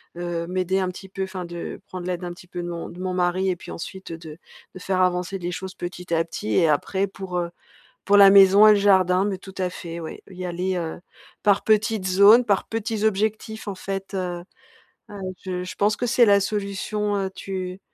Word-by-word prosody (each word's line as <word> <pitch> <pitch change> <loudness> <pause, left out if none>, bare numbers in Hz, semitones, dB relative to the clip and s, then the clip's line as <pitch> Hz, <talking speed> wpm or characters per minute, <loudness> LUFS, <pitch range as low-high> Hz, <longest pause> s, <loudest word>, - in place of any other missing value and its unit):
heu, 170 -1 -3
m'aider 185 +1 0
un 185 - 0
petit 190 +1 -9
peu 195 0 -4
enfin, 190 -1 -5
de 170 0 -6
prendre 180 -1 -7
l'aide 180 0 -3
un 175 - -4
petit 180 +1 -15
peu 175 0 -6
de 175 - -4
mon 170 -1 -5
de 180 - -10
mon 185 0 -2
mari 180 +1 +1
et 180 - -1
puis - - -12
ensuite, 190 +1 -7
heu, 165 - -5
de 160 -1 -10 0.4
de - - -8
faire 185 0 0
avancer 180 +1 0
les 175 0 -3
choses 185 +1 -6
petit 175 0 -6
à 165 0 +3
petit. 110 -10 -5
Et 160 - +4
après 190 +6 +1
pour, 190 -2 -6
heu, 170 -1 -1 0.6
pour 205 - +4
la 200 -1 +9
maison 195 +1 +8
et - - +9
le - - +6
jardin, 190 -2 +4
mais 200 -2 -2
tout 190 0 -13
à 185 -1 0
fait, 170 -1 -7
ouais, 160 - -7
y 185 -1 -7
aller, 180 +2 -2
heu, 165 -2 -4 0.4
par 205 -1 +3
petites 215 -2 +2
zones, 200 +6 +6
par 200 -4 +1
petits 225 -1 -3
objectifs, 215 +1 -1
en 200 - -3
fait. 195 +1 -5
Heu, 180 -2 -3 0.7
ah, 205 - -9
oui, 185 0 -4
je 180 -1 -3
je 180 - -6
pense 205 +1 +2
que 245 - -2
c'est 240 0 +5
la 200 -1 +5
solution, 205 +1 -2
heu, 195 -1 -1
tu 185 -1 -5
185 Hz, 225 wpm, -23 LUFS, 180-200 Hz, 0.7 s, la